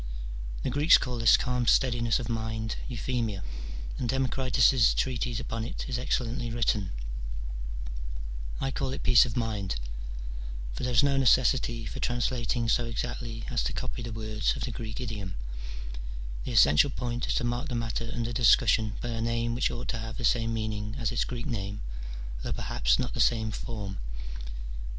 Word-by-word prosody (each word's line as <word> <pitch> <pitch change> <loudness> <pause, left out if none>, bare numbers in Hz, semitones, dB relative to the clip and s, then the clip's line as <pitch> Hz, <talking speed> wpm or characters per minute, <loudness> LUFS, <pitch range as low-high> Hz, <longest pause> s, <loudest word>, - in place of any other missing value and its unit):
The - - 0
Greeks 145 +5 +7
call 125 -3 -3
this 115 - +7
calm 125 -1 0
steadiness 120 -3 +4
of 120 - -4
mind 110 -1 -2
euthymia, 115 -5 -1 0.6
and 120 - -1
Democritus's 130 -2 +4
treatise 125 -2 0
upon 115 -1 -3
it 115 - -4
is 125 -2 -1
excel 125 0 +1
lently 120 0 -3
written: 110 -4 +1 1.7
I 135 - 0
call 130 - -1
it - - -5
peace 120 +1 +7
of 120 +1 -4
mind: 105 - -1 1.0
for - - -5
there 125 - 0
is 120 +3 +5
no 140 -1 +3
necessity 125 -3 +3
for - - -5
translating 120 -1 0
so 120 +1 +3
exactly 115 0 -3
as 120 - +1
to - - -1
copy 130 -2 -3
the 115 0 -4
words 110 -1 0
of - - -4
the 125 - -2
Grreek 110 -1 -5
idiom: 105 -6 -4 1.1
the - - -3
essential 75 - +6
point 120 -1 -2
is - - +1
to - - +1
mark 120 +5 -1
the 125 - -3
matter 115 0 -2
under 120 0 -2
discussion 110 -2 +5
by 120 - -3
a 115 -1 -2
name 115 0 0
which 120 - +2
ought 120 +1 -5
to 120 - -1
have 110 0 -5
the 120 - -1
same 115 -1 +3
meaning 110 -1 -2
as 115 -4 0
its - - +1
Greek 120 -1 -4
name, 100 -2 -3 0.6
though - - -2
perhaps - - +2
not - - -2
the - - -4
same 110 -2 +3
form. 105 -4 -5
115 Hz, 175 wpm, -29 LUFS, 110-125 Hz, 1.7 s, Greeks